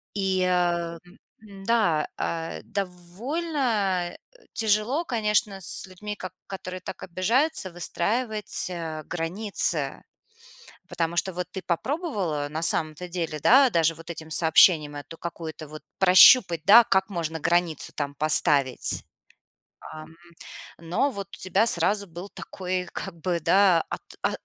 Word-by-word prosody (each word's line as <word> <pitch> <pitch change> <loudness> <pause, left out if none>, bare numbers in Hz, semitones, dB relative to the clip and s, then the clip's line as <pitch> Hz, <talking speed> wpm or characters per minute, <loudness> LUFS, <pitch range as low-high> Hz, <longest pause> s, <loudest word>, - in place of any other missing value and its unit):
И, 190 -2 0
а, 175 -2 0
м, 175 +5 -19 0.2
м, 200 -3 -13
да, 200 -10 +1
э, 165 0 -4
довольно, 200 - -2
э, - - -13 0.4
тяжело, 220 +9 0
конечно, 210 -5 -1
с 185 - -5
людьми, 210 +3 -8
ко 185 -3 -8 0.2
которые 185 -1 -7
так - - -9
обижаются, 220 - 0
выстраивать, 210 +6 -2
э, 165 -3 -6
границы. 165 -4 0 0.9
Потому 165 0 -2
что 190 +2 0
вот 180 0 -4
ты 190 - -6
попробовала 185 - -2
на 155 +2 -5
самом-то 160 +1 +2
деле, 165 -3 -4
да, 265 - +5
даже 165 -5 +1
вот 165 +2 -13
этим 160 -1 -8
сообщением 160 -1 +4
эту 145 +3 -9
какую-то 160 -2 -7
вот 155 +1 -11 0.2
прощупать, 185 - +7
да, 220 +6 +9
как 190 -3 +1
можно 165 -4 -4
границу 175 -2 -1
там 145 -1 -3
поставить. 145 -3 +4 0.9
Ам, 155 0 -10 0.7
но 170 +12 -1
вот 200 -6 -7
у - - -20
тебя 190 +4 +1
сразу 200 +1 +1
был 175 +3 -10
такой 185 -1 -5
как 170 -4 -7
бы 175 0 -1
да 180 +1 +3
от - - -5 0.2
о - - +1
180 Hz, 135 wpm, -25 LUFS, 165-205 Hz, 0.9 s, да